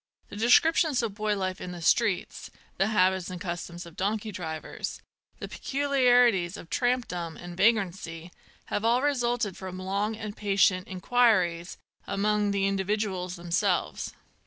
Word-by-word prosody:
The - - -9
descriptions 260 +5 +4
of 220 -3 -2
boy 210 0 -1
life 185 -1 -3
in 180 - -6
the 175 - -8
streets, 210 -1 +1 0.3
the 195 - +2
habits 190 -3 +2
and 180 -1 -6
customs 175 -1 -5
of 170 -1 -13
donkey 210 +3 -2
drivers, 160 -4 -5 0.4
the - - -6
peculiarities 245 -9 +2
of 165 - -12
tramp 245 -1 +1
dom 170 -2 -5
and 175 0 -9
vagrancy, 180 -5 0 0.4
have 205 - 0
all 240 +3 +3
resulted 240 -7 0
from 185 -1 -7
long 200 +4 -2
and 215 -1 -6
patient 195 -2 +2
inquiries 185 -4 +1 0.3
among 205 +1 +1
the 200 -1 +1
individuals 195 -2 -1
themselves. 175 - -1
195 Hz, 140 wpm, -27 LUFS, 180-225 Hz, 0.4 s, descriptions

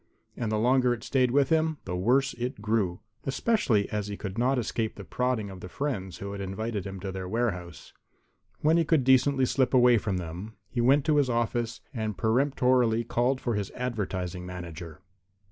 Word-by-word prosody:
And 115 -2 -2
the 110 - +1
longer 125 +2 +3
it 115 - -13
stayed 130 -2 +2
with 140 +2 +3
him, 160 -1 +2
the 90 - -3
worse 125 +9 +2
it 120 0 -4
grew, 105 -5 0 0.2
especially 135 - +1
as 105 -1 -2
he 100 -1 -5
could 100 -2 -5
not 125 +4 +2
escape 115 -2 -2
the 100 - -8
prodding 125 -3 -1
of 95 - -9
the 90 - -8
friends 100 -8 -3
who 100 0 -6
had 100 0 -5
invited 100 +1 -3
him 95 0 -7
to 95 0 -4
their 95 -1 -5
warehouse. 90 -7 -3 0.7
When 160 +2 +4
he 170 - +4
could 155 -3 +2
decently 130 +1 +4
slip 130 +1 +1
away 125 -2 +6
from 100 -2 -2
them 90 +6 -6 0.2
he 120 - 0
went 135 +4 +4
to 155 -2 +3
his 140 -3 +3
office 120 0 -1
and 110 -4 -3
peremptorily 125 -1 +2
called 120 +3 0
for 120 - -1
his 105 -2 -2
advertising 95 -7 -3
manager. 85 -3 -8
115 Hz, 190 wpm, -28 LUFS, 100-130 Hz, 0.7 s, away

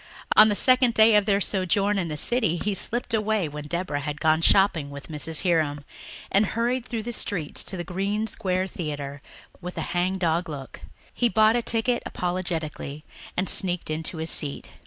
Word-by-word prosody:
On 215 0 +8
the 205 - +1
second 255 0 +4
day 220 0 +6
of 210 -1 +4
their 200 -1 +3
sojourn 200 +1 0
in 175 - -2
the 150 -2 -4
city 220 - 0
he 205 +4 -2
slipped 235 +4 -1
away 215 -4 0
when 150 0 -8
Deborah 170 -3 -3
had 145 +1 -5
gone 160 0 +2
shopping 170 -5 +3
with 140 +2 -10
Mrs. 155 +2 +1
Hiram 155 -5 0 0.5
and 200 - +4
hurried 235 +4 -1
through 230 -3 -4
the 240 +2 -5
streets 175 -8 -2
to 190 - -4
the 175 - -4
Green 195 +5 -2
Square 190 -4 -2
Theatre 145 -4 -6 0.4
with 180 0 -7
a - - -2
hang 180 +2 0
dog 170 -1 0
look. 140 -3 -8 0.3
He 240 - +1
bought 220 0 +4
a 240 - +1
ticket 235 +1 0
apologetically 165 -5 -4 0.3
and 185 +1 0
sneaked 175 -3 +4
in 155 +1 -2
to 160 +1 -4
his 160 +1 0
seat. 145 -3 -1
185 Hz, 190 wpm, -25 LUFS, 155-215 Hz, 0.5 s, On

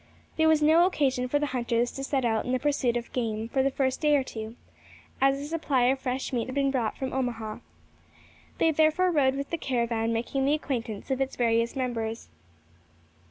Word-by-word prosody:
There 320 0 +3
was 315 -1 +4
no 325 +4 +6
occasion 265 -7 0
for 290 - +1
the 295 - 0
hunters 240 -1 0
to 270 - -6
set 270 -2 0
out 220 -2 +1
in 250 - -2
the - - +3
pursuit 260 -3 0
of 235 - -7
game 225 -2 -2
for 265 - +1
the 270 - +2
first 265 -1 -1
day 300 -1 +4
or 275 - +2
two, 220 -2 -7 0.7
as 270 0 +4
a 285 - -5
supply 295 -5 0
of 265 +2 +2
fresh 260 +1 -3
meat 235 -1 -1
had 260 - -6
been 275 -1 +2
brought 240 -5 -1
from 265 -1 -4
Omaha. 230 -5 -3 1.0
They 325 - +3
therefore 315 +4 +3
rode 270 -5 +3
with 280 0 -5
the 335 - -2
caravan, 235 -4 -1
making 240 +4 -1
the 290 +2 +3
acquaintance 240 -6 -4
of 265 0 0
its 270 - -1
various 230 0 +1
members. 230 -3 -3
260 Hz, 205 wpm, -27 LUFS, 235-280 Hz, 1.0 s, no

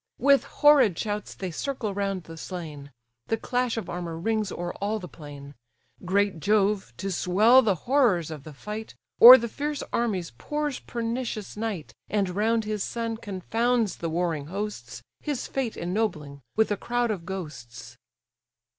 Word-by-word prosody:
With 275 +2 +4
horrid 275 - +5
shouts 210 -1 -3
they 185 -2 -5
circle 230 - -3
round 195 -2 -2
the 165 - -10
slain; 155 -4 -7 0.4
The 225 - 0
clash 245 0 -1
of 225 - -4
armour 170 -2 -5
rings 215 +3 -1
o'er 175 0 -4
all 210 +2 0
the 185 -4 -7
plain. 145 -3 -11 0.5
Great 195 -1 +1
Jove, 205 - +1
to 195 +5 -3
swell 210 +9 +5
the 210 -6 +2
horrors 235 - +3
of 155 -3 -7
the 155 - -9
fight, 210 +9 -7 0.3
O'er 250 +3 +13
the 235 - -3
fierce 290 +4 -3
armies 200 -8 -1
pours 295 -2 -2
pernicious 230 -2 -4
night, 210 -7 -4 0.2
And 200 -3 +1
round 220 +4 +1
his 210 -2 -2
son 230 -1 -3
confounds 225 +2 -1
the 165 - -3
warring 160 -3 -1
hosts, 205 +5 -5 0.2
His 290 -4 -3
fate 260 -5 -3
ennobling 170 -7 -2
with 220 0 +2
a 205 - +1
crowd 240 -1 0
of 190 -5 -4
ghosts. 135 -11 -8
205 Hz, 155 wpm, -26 LUFS, 175-230 Hz, 0.5 s, O'er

